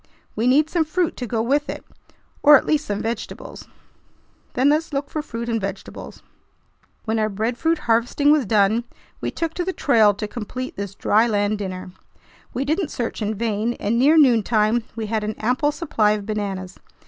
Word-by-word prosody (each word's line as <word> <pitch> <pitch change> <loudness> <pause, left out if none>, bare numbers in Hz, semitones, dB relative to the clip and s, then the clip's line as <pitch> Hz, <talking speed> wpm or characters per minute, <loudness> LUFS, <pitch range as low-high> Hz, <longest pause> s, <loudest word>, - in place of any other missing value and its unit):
"We 225 +3 0
need 290 +4 +4
some 330 0 +1
fruit 325 +2 -1
to 245 - -4
go 225 -1 -1
with 285 +5 +1
it, - - -6 0.6
or 295 0 +9
at - - -3
least 305 -1 0
some 205 0 -2
vegetables." 225 -1 -6 0.9
"Then 260 +3 +3
let's 310 +1 0
look 280 0 -3
for 310 - -2
fruit 235 -5 -6
and 225 -2 -1
vegetables." 195 0 -7 0.8
When 220 0 0
our 215 0 +1
breadfruit 235 +11 0
harvesting 240 +4 +2
was 295 -7 +3
done, 215 +3 +2 0.3
we - - -2
took 330 -1 -3
to 355 - -2
the 375 +1 -2
trail 220 - +4
to 210 +1 -4
complete 250 +4 -6
this 200 -1 -6
"dry 220 +3 +3
land 205 -1 0
dinner." 185 -2 -5 0.6
We 270 - -2
didn't 315 +3 0
search 240 -3 -4
in 215 +1 -1
vain, 225 +1 -1
and 230 +1 -1
near 295 +5 +5
noontime 230 -4 +3
we 225 -1 -3
had 215 0 -1
an 215 0 -3
ample 255 +6 +1
supply 225 -10 +1
of 210 -1 -4
bananas. 195 -4 -4
230 Hz, 185 wpm, -22 LUFS, 210-285 Hz, 0.9 s, or